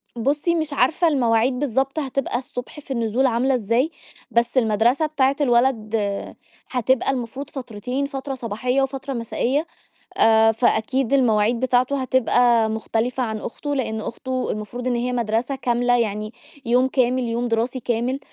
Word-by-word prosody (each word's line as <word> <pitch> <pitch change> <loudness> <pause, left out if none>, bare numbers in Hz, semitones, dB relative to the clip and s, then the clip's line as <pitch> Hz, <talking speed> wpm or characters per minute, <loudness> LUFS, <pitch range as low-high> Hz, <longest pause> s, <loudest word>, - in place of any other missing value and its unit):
بُصّي، 290 +8 0
مش 315 -3 -2
عارفة 290 +6 +2
المواعيد 250 -3 +2
بالضبط 270 +2 0
هتبقى 270 -3 -2
الصبح 250 +2 -8
في 280 - -11
النزول 235 +1 +1
عاملة 255 +2 +2
إزاي، 240 +6 +1 0.4
بس 235 +2 +1
المدرسة 235 +5 +3
بتاعة 280 -3 +1
الولد 240 -4 +2
آآ، 200 -2 -2 0.3
هتبقى 255 +1 +1
المفروض 260 +2 -5
فترتين 250 +1 -4
فترة 275 -1 -5
صباحية 250 +3 -1
وفترة 270 0 -3
مسائية، 255 +5 -1 0.5
آآ، 225 0 +5
فأكيد 235 +3 +1
المواعيد 230 -3 +3
بتاعته 260 +2 +1
هتبقى 245 -3 +3
مختلفة 225 +3 -1
عن 220 -2 -2
أخته، 290 +6 -4
لأن 220 -5 -2
أخته 255 +3 -3
المفروض 240 +4 -5
إن 245 - +1
هي 245 +1 -1
مدرسة 235 +3 -1
كاملة، 245 -1 +1
يعني 215 -1 -2 0.3
يوم 250 +2 +3
كامل 255 -1 +1
يوم 235 +1 -1
دراسي 235 +3 -1
كامل، 245 +3 -1
245 Hz, 145 wpm, -22 LUFS, 230-265 Hz, 0.5 s, آآ